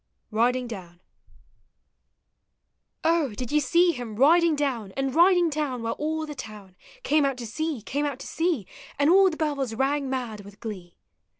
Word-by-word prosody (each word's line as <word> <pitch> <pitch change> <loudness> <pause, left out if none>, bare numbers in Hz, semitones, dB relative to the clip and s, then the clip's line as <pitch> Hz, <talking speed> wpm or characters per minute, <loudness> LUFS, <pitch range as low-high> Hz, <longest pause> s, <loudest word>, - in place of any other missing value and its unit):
R1DINO 245 +3 +1
DOWN. 180 -6 -9 2.0
On, 320 -7 +2
did 245 +3 -5
you 300 - +4
see 340 +6 +3
him 245 -7 -6
riding 325 +6 +5
down. 250 -9 -2
And 270 -1 -1
riding 350 +1 +5
down, 290 -6 -2
while 230 - -1
all 315 +1 -2
the 300 - -7
town 210 -8 -10 0.3
Came 305 -5 +3
out 275 -2 0
to 240 - -6
see, 295 +1 -3
came 290 +5 -1
out 280 -3 -4
to - - -10
see, 325 - -1 0.3
And 285 +3 +4
all 385 +1 +6
the 315 - -6
bells 280 -7 -1
rang 275 +2 0
mad 245 -5 -3
with 200 0 -14
glee? 185 -6 -8
270 Hz, 170 wpm, -26 LUFS, 230-310 Hz, 2.0 s, all